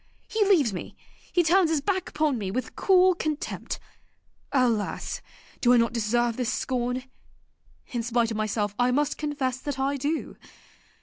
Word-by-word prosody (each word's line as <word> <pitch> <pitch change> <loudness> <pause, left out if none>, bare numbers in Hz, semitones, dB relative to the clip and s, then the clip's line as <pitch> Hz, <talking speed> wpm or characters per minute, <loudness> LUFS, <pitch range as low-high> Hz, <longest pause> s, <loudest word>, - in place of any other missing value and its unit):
he 435 -1 +1
leaves 310 - +4
me, 180 - -6 0.4
he 350 - +3
turns 345 +1 +4
his 320 -2 +2
back 375 +4 -1
upon 300 -3 +1
me 205 -5 -3
with 250 +7 -3
cool 370 -1 +5
contempt! 310 -3 -3 0.7
Alas! 240 -6 0 0.4
do 245 0 +5
I - - +6
not 230 0 +2
deserve 235 +1 +1
this 250 -3 0
scorn? 250 0 -1 0.9
In 240 -3 -1
spite 230 0 +1
of 220 - -2
myself 210 -1 -1
I 245 0 +4
must 290 +3 0
confess 275 -4 -2
that 285 0 -4
I 275 +1 0
do. 295 +4 -2
255 Hz, 160 wpm, -26 LUFS, 235-305 Hz, 0.9 s, I